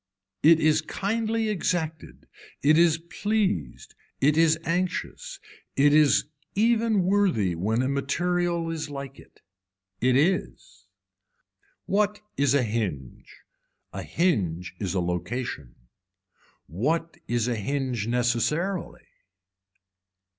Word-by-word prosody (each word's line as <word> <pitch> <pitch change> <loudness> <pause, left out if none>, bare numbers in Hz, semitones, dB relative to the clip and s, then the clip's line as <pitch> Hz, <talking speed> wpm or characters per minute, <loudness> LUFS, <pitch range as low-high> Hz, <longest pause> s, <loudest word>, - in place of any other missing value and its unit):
It 160 +1 +6
is 155 -1 +3
kindly 220 +6 -1
exacted, 170 -5 -3 0.4
it 150 +2 +5
is 165 -1 +4
pleased, 170 - -2 0.3
it 150 +2 +3
is 160 0 +4
anxious, 185 - -3 0.4
it 145 +1 +4
is 150 -2 +5 0.3
even 225 -1 +2
worthy 180 - +2
when 110 +8 0
a - - 0
material 170 +4 -1
is 160 -2 -4
like 140 -2 -7
it. - - -19 0.6
It 125 +1 +2
is. 140 - -1 1.0
What 210 +1 +1 0.2
is 140 -1 +2
a 140 - +3
hinge. 100 - -4 0.5
A - - -5
hinge 90 - -1
is 100 -2 -3
a - - +2
location. 90 - -4 0.9
What 155 - -2
is 120 -1 0
a 120 - 0
hinge 125 0 -2
necessarily. 125 - -1
150 Hz, 105 wpm, -26 LUFS, 115-180 Hz, 1.0 s, It